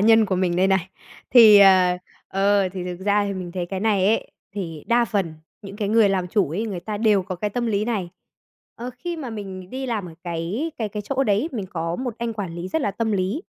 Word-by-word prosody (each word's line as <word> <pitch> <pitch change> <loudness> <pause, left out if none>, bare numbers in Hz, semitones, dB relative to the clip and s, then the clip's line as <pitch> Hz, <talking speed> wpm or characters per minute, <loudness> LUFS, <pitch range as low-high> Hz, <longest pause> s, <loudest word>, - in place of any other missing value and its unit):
nhân 225 +1 +5
của 195 - 0
mình 180 -1 0
đây 185 - +3
này! 190 -2 +1 0.4
Thì, 220 -4 +9
ờ, 185 -2 +6 0.3
ờ, 195 0 +2
thì 180 -1 -6
thực 180 0 -6
ra 205 0 +3
thì 200 - -2
mình 180 -2 -6
thấy 180 -1 -3
cái 190 +1 -4
này 205 -3 +2
ấy, 220 - +1 0.2
thì 165 -7 -5
đa 235 0 +3
phần 195 -7 -2 0.3
những 200 0 -9
cái 205 -2 -2
người 220 -1 +5
làm 185 -2 0
chủ 195 -5 +1
ấy, 205 +8 -2
người 195 -5 -4
ta 210 +4 -4
đều 210 -3 +3
có 185 0 -5
cái 205 +4 -3
tâm 240 +3 -2
lý 210 -2 0
này. 205 -7 -2 0.6
Ờ, 245 +2 -6
khi 345 +6 -4
mà 275 -6 -6
mình 190 -4 -7
đi 265 +1 -4
làm 215 -7 -2
ở 165 - -12
cái 175 - -3
cái 220 -3 -1
cái 210 +1 -5
chỗ 270 +5 -1
đấy, 210 +7 +1
mình 210 -6 -4
có 165 0 -3
một 250 -3 -4
anh 235 -1 -2
quản 200 -6 -5
lý 175 +2 -5
rất 320 - -1
là 205 - 0
tâm 220 +1 -2
lý. 195 - -1
200 Hz, 250 wpm, -23 LUFS, 185-225 Hz, 0.6 s, Thì